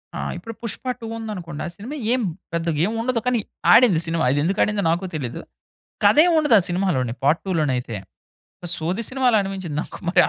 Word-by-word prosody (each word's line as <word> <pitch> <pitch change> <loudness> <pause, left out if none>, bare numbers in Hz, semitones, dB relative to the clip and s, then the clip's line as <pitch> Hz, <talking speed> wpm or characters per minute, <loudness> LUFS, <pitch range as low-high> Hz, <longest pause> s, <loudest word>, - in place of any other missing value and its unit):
ఆ! - - -4 0.2
ఇప్పుడు 230 -1 -8
'పుష్ప 230 +2 -4
2' 230 -2 -7
ఉందనుకోండి. 180 -9 -6
ఆ - - -4
సినిమా 245 +9 -7 0.2
ఏమి 250 -4 +1 0.3
పెద్దగా 165 -2 -1
ఏమి 220 +2 -2
ఉండదు. 245 -1 0
కానీ 245 -2 +2 0.3
ఆడింది 220 -10 +6
సినిమా. 165 0 0
అదెందుకు 155 +7 0
ఆడిందో 210 -2 0
నాకు 175 +3 -1
తెలీదు. 130 -6 -4 0.6
కథ 205 +6 +5
ఏమి 350 - +3
ఉండదు 295 -7 +4
ఆ - - +1
సినిమాలోని 175 -10 0
పార్ట్ 150 +5 +3
2 190 - -1
లోనైతే 125 -6 -1 0.7
ఆహ్, 170 - -3
సోది 180 +8 -2
సినిమాలా 255 -4 +3
అనిపించింది 190 -6 -5
నాకు - - -10
మరి 175 - +5
190 Hz, 185 wpm, -22 LUFS, 160-230 Hz, 0.7 s, ఆడింది